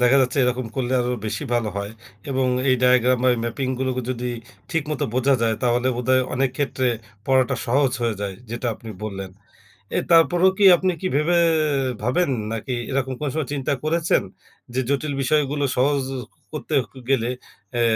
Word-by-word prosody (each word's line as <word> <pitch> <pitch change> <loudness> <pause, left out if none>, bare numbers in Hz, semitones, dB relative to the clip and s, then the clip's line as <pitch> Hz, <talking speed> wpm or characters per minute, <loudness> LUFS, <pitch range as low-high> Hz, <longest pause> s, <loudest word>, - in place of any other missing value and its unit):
দেখা 125 +2 +5
যাচ্ছে 130 +2 -1
এরকম 125 -1 -1
করলে 130 -1 -1
আরো 125 0 -1
বেশি 110 - -3
ভালো 120 -2 +1
হয় 100 +1 -4 0.4
এবং 130 -1 +1 0.2
এই 130 - +5
ডায়াগ্রাম 125 0 +4
ম্যা 130 - +5
ম্যাপিংগুলোকে 130 +1 -2
যদি 125 0 -3 0.4
ঠিক 165 -2 +1
মতো 150 -1 -1
বোঝা 135 +2 +3
যায়, 115 -1 +2
তাহলে 125 +1 +2
বোধহয় 130 +1 +2
অনেক 130 0 +1
ক্ষেত্রে 135 -2 0 0.4
পড়াটা 130 -1 +3
সহজ 135 +1 +2
হয়ে 115 -2 +1
যায়, 100 -1 -3 0.2
যেটা 120 +1 -3
আপনি 115 - -12 0.2
বললেন। 95 -2 -5 0.7
এ - - +2
তারপরেও 175 +3 +5
কি 205 - +4
আপনি 185 +2 +1
কি 185 - 0
ভেবে 160 +4 +3 0.7
ভাবেন 135 +8 +1 0.2
নাকি 115 +3 -3 0.2
এরকম 130 -1 -1
কোন 150 - -2
সময় 155 -5 -2
চিন্তা 140 0 -1
করেছেন? 165 +1 +2 0.5
যে 130 - 0
জটিল 140 +1 0
বিষয়গুলো 145 +1 +1
সহজ 140 +2 +2 0.5
করতে - - -5 0.2
ক - - -33 0.2
গেলে 120 -3 +2 0.4
অ্যা 120 - 0
130 Hz, 165 wpm, -23 LUFS, 120-145 Hz, 0.7 s, দেখা